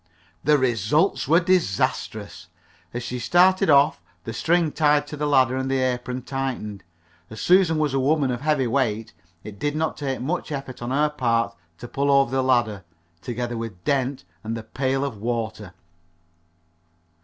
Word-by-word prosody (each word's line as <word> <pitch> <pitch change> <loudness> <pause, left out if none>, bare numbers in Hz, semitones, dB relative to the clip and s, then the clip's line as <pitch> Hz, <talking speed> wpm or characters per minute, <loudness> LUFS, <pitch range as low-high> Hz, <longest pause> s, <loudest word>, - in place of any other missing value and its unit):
The 150 +1 +4
result 130 - +1
was 165 +5 +5
disastrous. 175 - -1 0.4
As 120 0 -5
she 125 +1 -4
started 180 +8 +4
off 145 +1 +4 0.2
the 115 - -6
string 170 +3 +1
tied 150 -1 +2
to 150 - -7
the 150 0 -2
ladder 130 -3 +3
and 130 0 -2
her 135 - +1 0.2
apron 125 +1 -5
tightened. 125 -8 -4 0.5
As 110 - -9
Susan 180 -3 +4
was 150 -3 0
a 135 - +1
woman 140 0 +2
of 120 0 -4
heavy 150 -3 +1
weight, 115 -3 -1 0.3
it 100 -2 -10
did 145 +4 -1
not 160 +1 -1
take 135 -3 -3
much 155 +6 -3
effort 135 -3 -6
on 120 - -4
her 145 +3 +2
part 115 -5 0 0.2
to 120 - -9
pull 140 +3 -1
over 140 -2 +4
the 135 0 +1
ladder, 120 -6 +1 0.4
together 120 -1 -4
with 115 -6 -7
Dent 135 -4 0 0.2
and 115 +1 -3
the 115 - -7
pail 135 +4 -1
of 130 -6 -5
water. 110 -3 -3
130 Hz, 165 wpm, -23 LUFS, 120-150 Hz, 0.5 s, was